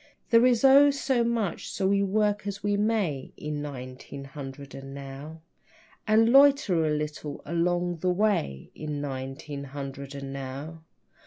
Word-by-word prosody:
There 230 +2 +7
is 245 -1 +2
oh, 275 +2 +8
so 270 -3 +1
much, 230 -7 -1
so 190 - -1
we 200 0 +3
work 205 +1 +1
as 200 0 -5
we 205 0 +1
may 200 -10 0
In 150 -1 -4
nineteen 135 -1 -7
hundred 135 -1 -9
and 135 0 -8
now, 140 +3 -8 0.7
And 220 +1 +5
loiter 275 - +5
a - - +1
little 150 -1 -3
along 175 +1 0
the 180 +3 0
way 180 - 0
In 150 -1 -5
nineteen 140 +1 -5
hundred 140 0 -7
and 135 -1 -6
now. 140 +4 -6
155 Hz, 150 wpm, -27 LUFS, 140-210 Hz, 0.7 s, oh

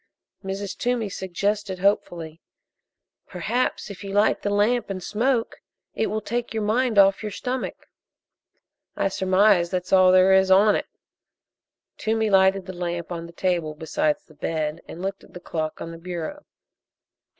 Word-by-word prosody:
Mrs. 195 +1 -4
Toomey 240 -4 -1
suggested 195 +2 -2
hopefully: 175 -4 -1 0.9
"Perhaps 210 +5 -2
if 200 - -10
you 195 - -6
light 205 +2 +3
the 205 - -1
lamp, 210 +4 +1
and 185 -2 -4
smoke, 235 +2 0 0.4
it 220 - 0
will 215 0 -2
take 235 +2 -3
your 220 - -1
mind 230 +2 +1
off 195 -1 +5
your 210 -1 -4
stomach." 255 +5 -4 1.1
"I - - +1
surmise 190 -1 +3
that's 180 0 -3
all 185 -1 +7
there 185 +1 +6
is 190 0 +4
on 200 +3 +6
it." - - -2 1.1
Toomey 220 -1 0
lighted 190 0 +4
the 185 - -7
lamp 175 -1 -4
on 170 -1 -5
the - - -12
table 170 -3 -1
beside 295 - 0
the 155 - -19
bed 155 0 -3
and 175 - -8
looked 195 0 -4
at - - -19
the - - -6
clock 160 -3 -4
on 165 - -6
the 165 - -9
bureau. 180 - -6
195 Hz, 160 wpm, -24 LUFS, 175-215 Hz, 1.1 s, all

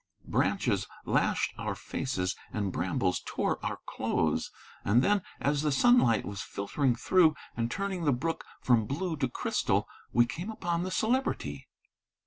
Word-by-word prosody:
Branches - - +1 0.2
lashed - - +1
our - - -2
faces 95 -8 -2 0.2
and 100 -3 -1
brambles 90 +1 0
tore - - -1
our - - -3
clothes. - - 0 0.3
And 115 +6 +4
then, 205 -1 +3 0.2
as 145 0 +1
the 150 -1 +1
sunlight 140 - +4
was 100 -1 -5
filtering 125 +5 0
through 160 +5 +4 0.2
and 115 0 -1
turning 190 +1 -2
the 145 - +4
brook 160 +6 -1 0.2
from 115 -4 +3
blue 165 - -2
to 130 -2 0
crystal, - - 0 0.2
we 120 0 +5
came 170 - -5
upon 175 -6 -1
the 185 - -2
Celebrity. 245 +8 -1
140 Hz, 145 wpm, -30 LUFS, 115-180 Hz, 0.3 s, we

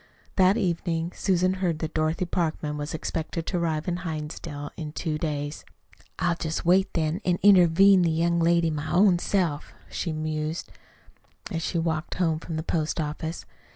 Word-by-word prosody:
That 190 +2 +4
evening 170 -2 -1
Susan 185 -1 +2
heard 170 -4 +1
that 160 0 -4
Dorothy 155 +3 0
Parkman 160 -3 -2
was 150 +1 -4
expected 160 +1 -3
to 180 - -1
arrive 160 -1 -1
in 175 -1 0
Hinsdale 150 -3 -5
in 155 -2 -6
two 155 -2 -2
days. 145 -1 -3 0.5
"I'll 175 +1 +1
jest 165 0 -3
wait, 185 +3 +4
then, 165 +3 0
an' 180 -2 +1
intervene 190 0 +6
the 170 - +3
young 170 +1 +1
lady 170 0 +3
my 150 0 -4
own 180 0 +5
self," 175 -7 -1 0.2
she 170 - -2
mused, 155 +1 -3 0.8
as 165 -3 -2
she 170 - -2
walked 165 -1 -1
home 165 -4 +1
from 165 0 -6
the 160 - -2
post 160 -1 -1
office. 160 +2 -4
165 Hz, 165 wpm, -26 LUFS, 155-175 Hz, 0.8 s, intervene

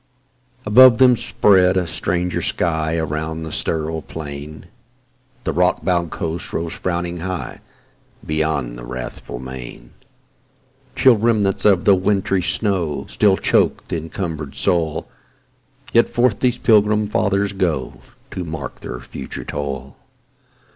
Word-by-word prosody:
'" 125 0 -35
ABOVE 120 +3 +7
them 125 -1 +6
spread 95 -4 +3
a 90 - +1
stranger 85 +3 -2
sky 80 -1 -1
Around, 80 +1 -3
the 80 - -6
sterile 80 0 -2
plain, 75 0 -8 0.8
The - - -2
rock - - +1
bound 85 -2 +1
coast 85 +1 -4
rose 80 0 -3
frowning 85 -1 -3
nigh, 90 +1 -5 0.6
Beyond, 75 -6 -1
the - - -9
wrathful - - -7
main: 65 -1 -9 1.0
Chill 130 -4 +5
remnants 105 -3 +1
of 95 -4 +4
the 100 - +7
wintry 95 0 +1
snow 90 -4 -1
Still 100 -3 +3
chok'd - - +1
the - - -1
encumber'd 80 -3 -5
soil, 80 -3 0 0.9
Yet 115 - +4
forth 120 -3 +1
these 125 -1 +1
Pilgrim 105 -1 +3
Fathers 100 -1 0
go, 85 -9 -2 0.3
To 90 - -4
mark 80 -6 -6
their 60 - -6
future 65 - -7
toil. 70 -2 -5
85 Hz, 125 wpm, -20 LUFS, 75-100 Hz, 1.0 s, ABOVE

